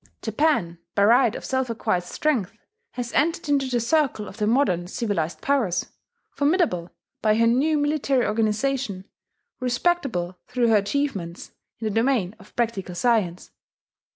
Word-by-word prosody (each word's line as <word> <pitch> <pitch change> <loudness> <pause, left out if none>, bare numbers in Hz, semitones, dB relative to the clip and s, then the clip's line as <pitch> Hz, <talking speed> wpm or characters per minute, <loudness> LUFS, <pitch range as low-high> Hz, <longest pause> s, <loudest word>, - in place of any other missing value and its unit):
Japan, 220 - +1 0.2
by 200 - +4
right 235 +2 +5
of - - -6
self 260 -1 -1
acquired 220 -5 0
strength, 220 +2 -1 0.4
has 240 -1 -5
entered 325 +2 +1
into 280 -2 +2
the 250 -2 0
circle 245 -4 +1
of 195 - -11
the 210 -2 0
modern 205 -8 +2
civilized 185 -6 -2
powers, 260 -11 0 0.4
formidable 285 - +1 0.3
by 215 -1 +3
her 230 +1 +3
new 275 +7 +3
military 290 -3 +1
organization, 215 -1 -1 0.5
respectable 245 - -1
through 245 -2 +1
her 220 - +6
achievements 200 -6 -2 0.3
in 225 - -6
the 215 - 0
domain 225 -4 +1
of 200 +1 -18
practical 215 -7 -2
science. 200 -5 0
230 Hz, 140 wpm, -24 LUFS, 200-275 Hz, 0.5 s, her